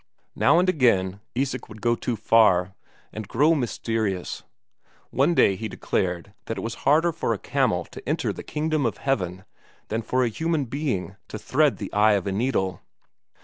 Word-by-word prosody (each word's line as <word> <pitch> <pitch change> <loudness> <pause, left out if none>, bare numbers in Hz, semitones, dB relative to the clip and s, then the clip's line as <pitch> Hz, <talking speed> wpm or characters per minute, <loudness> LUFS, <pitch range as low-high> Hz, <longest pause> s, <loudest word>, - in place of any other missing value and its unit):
Now - - +4
and 180 +1 +3
again, 100 - +2 0.2
Isak 130 0 -2
would 110 -1 -11
go 120 +2 +2
too 120 +1 -2
far, 105 -4 +3 0.4
and 110 -2 -6
grow 150 - +3
mysterious; 115 - -2 0.7
one 140 +7 +2
Friday 100 - +4
he 110 +3 -4
declared 90 -1 -2
that 115 - -4
it - - -3
was 115 +3 -4 0.2
harder 160 +4 +4
for 150 -8 -1
a - - -6
camel - - 0
to - - -9
enter - - 0
the - - -8
kingdom 155 -1 -1
of 115 - -4
heaven 95 -8 -2 0.4
than 110 +1 -1
for 130 +3 0
a 120 - +1
human 160 +4 -1
being 120 -8 -3
to - - -6
thread 145 +6 +2
the 100 - -7
eye 105 +1 +5
of 100 -3 0
a 100 - -1
needle. 95 -4 -1
115 Hz, 180 wpm, -24 LUFS, 100-140 Hz, 0.7 s, eye